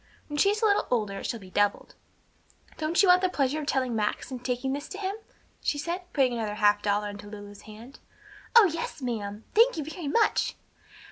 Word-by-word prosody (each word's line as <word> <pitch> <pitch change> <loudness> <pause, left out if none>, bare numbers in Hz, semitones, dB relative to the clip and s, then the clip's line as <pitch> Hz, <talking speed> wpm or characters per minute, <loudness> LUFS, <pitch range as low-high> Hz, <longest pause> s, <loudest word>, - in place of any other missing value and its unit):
When 295 - -4
she 395 - +5
is 425 +2 -1
a - - +6
little 410 -1 +3
older 210 -5 -1
it - - -4
shall 230 - -3
be 185 -2 -13
doubled. 205 +1 0 0.9
Don't 325 +5 +2
you - - +5
want 360 0 +7
the 370 - +2
pleasure 285 -2 0
of 295 - -6
telling 255 -4 0
Max, 210 +4 -2
and 250 -1 -6
taking 260 +1 -1
this 285 +2 -5
to 385 - -7
him?" 390 -1 -2 0.5
she 290 - 0
asked, 350 +4 -4
putting 260 -4 +2
another 220 -3 -3
half 205 -1 +3
dollar 205 0 0
into 205 0 -9
Lulu's 205 -1 -10
hand. 230 +6 -12 0.6
"Oh 465 -3 +10
yes, 330 -5 -3
ma'am! 215 -3 -4
Thank 470 +1 +5
you 310 - -2
very 315 +1 -6
much!" 435 +10 +2
265 Hz, 210 wpm, -27 LUFS, 210-335 Hz, 0.9 s, Oh